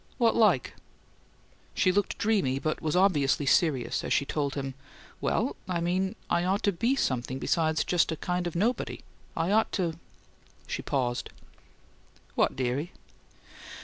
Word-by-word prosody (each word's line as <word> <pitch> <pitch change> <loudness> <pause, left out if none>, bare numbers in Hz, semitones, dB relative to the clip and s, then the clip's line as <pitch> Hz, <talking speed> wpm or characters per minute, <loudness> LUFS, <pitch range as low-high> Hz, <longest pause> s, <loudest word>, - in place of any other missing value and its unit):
"What 235 -3 +3
like?" 200 - +3 1.0
She 185 - +3
looked 205 +2 0
dreamy, 195 -12 +1
but 155 +3 -2
was 155 0 -1
obviously 150 -7 +3
serious 140 -3 +2
as - - -4
she 140 - +2
told 140 -1 -2
him: 135 -1 -3 0.5
"Well, - - 0
I 175 -2 0
mean 185 +4 0
I 170 - +1
ought 190 +3 0
to 200 - +3
be 230 +9 +1
something 130 - -1
besides 160 +2 +1
just 175 -1 +2
a - - -1
kind 180 +1 -2
of 175 - -5
nobody. 225 +8 -1 0.3
I 165 +3 +1
ought 220 +1 +3
to 170 -4 -1 0.3
" - - -32
She - - -4
paused. 120 -3 -1 1.0
"What, - - +2
dearie?" 135 +6 -2
170 Hz, 150 wpm, -28 LUFS, 140-190 Hz, 1.0 s, What